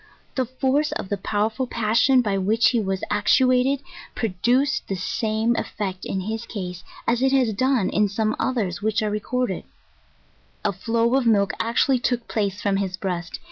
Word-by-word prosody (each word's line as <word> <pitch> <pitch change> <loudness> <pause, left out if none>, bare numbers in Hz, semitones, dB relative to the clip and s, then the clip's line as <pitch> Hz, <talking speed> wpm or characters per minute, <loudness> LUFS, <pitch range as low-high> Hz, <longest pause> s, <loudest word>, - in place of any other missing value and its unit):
The 260 - 0
force 265 +4 0
of 190 - -5
the 205 - -1
powerful 220 +6 -1
passion 235 +3 +3
by 205 -3 0
which 215 +5 +3
he 240 - +1
was 195 -3 -2
actuated, 255 +5 +3 0.3
produced 240 +6 +1
the 195 - -2
same 220 +5 0
ef - - -2
fect 190 -3 -3
in 190 - -2
his 220 +4 -4
case, 180 -4 -6 0.2
as 235 +1 +2
it 265 0 +3
has 255 -5 +3
done 255 -1 +1
in 210 0 +2
some 215 +2 0
others 205 -7 -1
which 220 +1 0
are 210 - 0
re 210 - -1
corded; 250 -3 -2 1.0
a - - +2
flow 230 +4 0
of 265 -3 +2
milk 200 -2 +3
actually 245 +3 +2
took 240 -1 -1
place 205 -2 -1
from 200 -1 +2
his 190 -2 -2
breast. 175 -3 -4
220 Hz, 180 wpm, -23 LUFS, 200-250 Hz, 1.0 s, passion